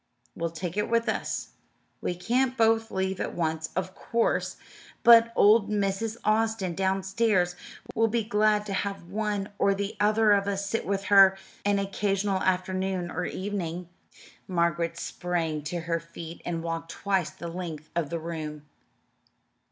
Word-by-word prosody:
"We'll 170 Hz, 0 st, -2 dB
take 170 Hz, +3 st, -5 dB
it 210 Hz, -, 0 dB
with 230 Hz, 0 st, +2 dB
us. 220 Hz, -, -2 dB, 0.5 s
We 175 Hz, -, -2 dB
can't 250 Hz, +8 st, 0 dB
both 225 Hz, -1 st, +3 dB
leave 190 Hz, 0 st, -2 dB
at -, -, -3 dB
once, 160 Hz, -1 st, -1 dB
of 185 Hz, +1 st, -2 dB
course, 230 Hz, +3 st, 0 dB, 0.5 s
but 230 Hz, -1 st, +8 dB
old 210 Hz, 0 st, +5 dB
Mrs. 210 Hz, +2 st, -1 dB
Austin, 215 Hz, -3 st, +1 dB
downstairs, 190 Hz, 0 st, +1 dB, 0.4 s
will 225 Hz, 0 st, +3 dB
be 230 Hz, +1 st, 0 dB
glad 210 Hz, -1 st, +2 dB
to 200 Hz, -, -4 dB
have 195 Hz, -1 st, -2 dB
one 210 Hz, -1 st, -1 dB
or 200 Hz, 0 st, +3 dB
the 200 Hz, +1 st, -3 dB
other 215 Hz, +1 st, +4 dB
of 200 Hz, -1 st, +3 dB
us 200 Hz, 0 st, -1 dB
sit 225 Hz, +3 st, -2 dB
with 195 Hz, 0 st, -1 dB
her 195 Hz, -1 st, +8 dB, 0.3 s
an 205 Hz, 0 st, +3 dB
occasional 195 Hz, 0 st, 0 dB
afternoon 185 Hz, -1 st, -1 dB
or 180 Hz, -, -2 dB
evening." 180 Hz, -3 st, -4 dB, 0.6 s
Margaret 170 Hz, -2 st, 0 dB
sprang 170 Hz, -3 st, -2 dB
to 170 Hz, +3 st, -3 dB
her 165 Hz, 0 st, -1 dB
feet 165 Hz, 0 st, -9 dB
and 165 Hz, -1 st, -3 dB
walked 165 Hz, 0 st, -4 dB
twice 190 Hz, -3 st, 0 dB
the 170 Hz, -, -8 dB
length 165 Hz, -3 st, -6 dB
of 165 Hz, -4 st, 0 dB
the 170 Hz, -, -2 dB
room. 155 Hz, -2 st, -5 dB
190 Hz, 150 wpm, -27 LUFS, 170-210 Hz, 0.6 s, but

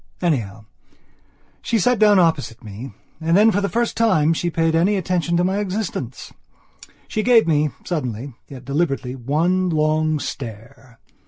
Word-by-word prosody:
Anyhow, 110 Hz, -, -2 dB, 1.0 s
she 230 Hz, -, 0 dB
sat 245 Hz, +3 st, +2 dB
down 210 Hz, -2 st, +5 dB
opposite 160 Hz, -9 st, +1 dB
me 110 Hz, +5 st, -8 dB, 0.3 s
and 165 Hz, +2 st, +2 dB
then, 220 Hz, +2 st, +6 dB
for 205 Hz, -, 0 dB
the 200 Hz, -, -1 dB
first 235 Hz, +5 st, -1 dB
time, 165 Hz, -9 st, +3 dB
she 175 Hz, +2 st, -1 dB
paid 165 Hz, -1 st, 0 dB
any 175 Hz, +6 st, +2 dB
attention 175 Hz, -2 st, 0 dB
to 175 Hz, -, +2 dB
my 190 Hz, +2 st, 0 dB
existence. 190 Hz, -, -4 dB, 0.7 s
She 215 Hz, -, -2 dB
gave 235 Hz, 0 st, +5 dB
me, 150 Hz, -1 st, +2 dB, 0.2 s
suddenly, 130 Hz, -5 st, -4 dB
yet 130 Hz, -2 st, -11 dB
deliberately, 140 Hz, -3 st, -1 dB
one 165 Hz, +9 st, 0 dB
long 155 Hz, -1 st, +1 dB
stare. 120 Hz, -1 st, -8 dB
160 Hz, 150 wpm, -21 LUFS, 135-185 Hz, 1.0 s, then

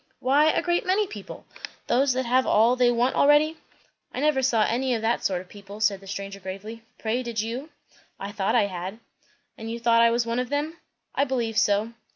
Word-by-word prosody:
"Why, 285 Hz, +4 st, +3 dB
a 330 Hz, -, +1 dB
great 350 Hz, 0 st, +1 dB
many 390 Hz, +3 st, +2 dB
people. 410 Hz, -, -10 dB, 0.4 s
Those 265 Hz, +1 st, +2 dB
that 260 Hz, 0 st, -1 dB
have 255 Hz, +2 st, +2 dB
all 230 Hz, +4 st, +4 dB
they 250 Hz, -1 st, +3 dB
want 240 Hz, +2 st, +1 dB
already." 295 Hz, +2 st, +4 dB, 0.5 s
"I -, -, -5 dB
never 295 Hz, -2 st, +2 dB
saw 235 Hz, -4 st, +3 dB
any 250 Hz, +3 st, 0 dB
of 225 Hz, -, -4 dB
that 230 Hz, +1 st, 0 dB
sort 185 Hz, -2 st, 0 dB
of 185 Hz, -, -15 dB
people," 200 Hz, +1 st, -12 dB
said 205 Hz, -2 st, +2 dB
the 195 Hz, -, -15 dB
stranger 195 Hz, 0 st, -6 dB
gravely. 195 Hz, +4 st, -8 dB, 0.2 s
"Pray, 230 Hz, +3 st, -1 dB
did 235 Hz, -3 st, -4 dB
you?" 240 Hz, +7 st, -4 dB, 0.5 s
"I 200 Hz, +1 st, -5 dB
thought 195 Hz, -1 st, -1 dB
I -, -, +4 dB
had." 185 Hz, +1 st, -6 dB, 0.6 s
"And 225 Hz, 0 st, -6 dB
you 230 Hz, +1 st, -4 dB
thought 230 Hz, 0 st, +4 dB
I 235 Hz, -, +6 dB
was 235 Hz, 0 st, +1 dB
one 230 Hz, +1 st, -1 dB
of 250 Hz, -1 st, -2 dB
them?" 300 Hz, +3 st, -2 dB, 0.4 s
"I 280 Hz, -, +2 dB
believe 240 Hz, -5 st, -2 dB
so." 215 Hz, +1 st, +2 dB
235 Hz, 210 wpm, -25 LUFS, 210-265 Hz, 0.6 s, I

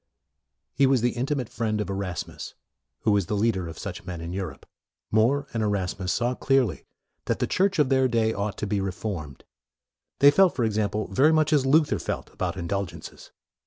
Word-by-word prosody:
He 140 Hz, -1 st, +4 dB
was 130 Hz, -3 st, +3 dB
the 120 Hz, +1 st, +2 dB
intimate 130 Hz, +1 st, -2 dB
friend 110 Hz, -2 st, -2 dB
of 105 Hz, -, -2 dB
Erasmus, 95 Hz, -3 st, -5 dB, 0.5 s
who 110 Hz, -, +2 dB
was 100 Hz, -4 st, +2 dB
the 105 Hz, -, -1 dB
leader 100 Hz, -4 st, 0 dB
of 80 Hz, -1 st, -8 dB
such -, -, -6 dB
men 90 Hz, -2 st, -6 dB
in 85 Hz, +1 st, -6 dB
Europe. 90 Hz, -8 st, -5 dB, 0.5 s
More 125 Hz, +7 st, +3 dB
and 115 Hz, -, -1 dB
Erasmus 95 Hz, -3 st, -1 dB
saw 120 Hz, +4 st, 0 dB
clearly 125 Hz, -, +1 dB, 0.4 s
that -, -, 0 dB
the -, -, 0 dB
Church 195 Hz, +1 st, +1 dB
of 150 Hz, -4 st, +3 dB
their 130 Hz, -1 st, +3 dB
day 115 Hz, -2 st, +1 dB
ought 100 Hz, 0 st, -3 dB
to -, -, -3 dB
be 100 Hz, -1 st, -1 dB
reformed. 90 Hz, -7 st, -5 dB, 0.7 s
They 140 Hz, 0 st, +7 dB
felt, 190 Hz, +3 st, +4 dB
for 125 Hz, -, 0 dB
example, 105 Hz, -1 st, -1 dB
very 140 Hz, +10 st, +4 dB
much 155 Hz, -1 st, +3 dB
as 135 Hz, -3 st, +3 dB
Luther 150 Hz, +2 st, +3 dB
felt -, -, -5 dB
about -, -, -3 dB
indulgences. 95 Hz, +1 st, -5 dB
110 Hz, 185 wpm, -26 LUFS, 95-135 Hz, 0.7 s, They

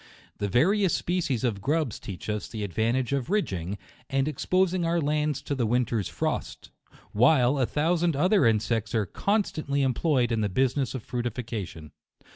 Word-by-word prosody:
The 105 Hz, -, 0 dB
various 185 Hz, -, +3 dB
species 165 Hz, -9 st, -1 dB
of 110 Hz, -6 st, -1 dB
grubs 145 Hz, 0 st, 0 dB
teach 95 Hz, -3 st, -8 dB
us 105 Hz, -1 st, -2 dB
the 110 Hz, -2 st, -5 dB
advantage 115 Hz, +7 st, 0 dB
of 140 Hz, +1 st, -1 dB
ridging, 100 Hz, -, -1 dB, 0.3 s
and 135 Hz, 0 st, +1 dB
exposing 185 Hz, +4 st, +1 dB
our 170 Hz, +1 st, +1 dB
lands 150 Hz, -1 st, 0 dB
to -, -, -3 dB
the 125 Hz, -5 st, 0 dB
winter's 115 Hz, -4 st, 0 dB
frost; 80 Hz, -, -3 dB, 0.2 s
— -, -, -22 dB
while 125 Hz, +3 st, +4 dB
a 130 Hz, -, +2 dB
thousand 165 Hz, +1 st, +1 dB
other 180 Hz, -, +4 dB
insects 110 Hz, +1 st, 0 dB
are 110 Hz, -2 st, +2 dB
constant 195 Hz, -, -1 dB
ly 140 Hz, -, +1 dB
employed 130 Hz, -1 st, +1 dB
in 115 Hz, -1 st, +1 dB
the 105 Hz, -, 0 dB
business 130 Hz, +5 st, 0 dB
of 125 Hz, -, -5 dB
fructification. 115 Hz, -10 st, -5 dB
130 Hz, 165 wpm, -27 LUFS, 110-155 Hz, 0.3 s, while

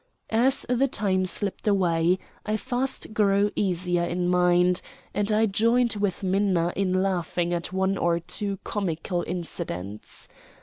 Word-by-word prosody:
As 245 Hz, +4 st, +3 dB
the 250 Hz, +2 st, +2 dB
time 190 Hz, -6 st, 0 dB
slipped 200 Hz, +3 st, -3 dB
away 180 Hz, -3 st, +3 dB, 0.3 s
I 215 Hz, 0 st, -1 dB
fast 245 Hz, 0 st, -3 dB
grew 205 Hz, -1 st, +3 dB
easier 180 Hz, -3 st, 0 dB
in 175 Hz, +1 st, -1 dB
mind, 180 Hz, 0 st, +3 dB, 0.3 s
and 205 Hz, +1 st, 0 dB
I 215 Hz, +1 st, +4 dB
joined 230 Hz, +4 st, +2 dB
with 200 Hz, -1 st, -1 dB
Minna 185 Hz, -3 st, +1 dB
in 185 Hz, -1 st, +1 dB
laughing 175 Hz, -2 st, -1 dB
at 170 Hz, 0 st, -3 dB
one 190 Hz, +1 st, 0 dB
or 170 Hz, 0 st, +2 dB
two 200 Hz, +3 st, -3 dB
comical 175 Hz, -2 st, -2 dB
incidents. 160 Hz, -, -6 dB
190 Hz, 135 wpm, -25 LUFS, 175-205 Hz, 0.3 s, I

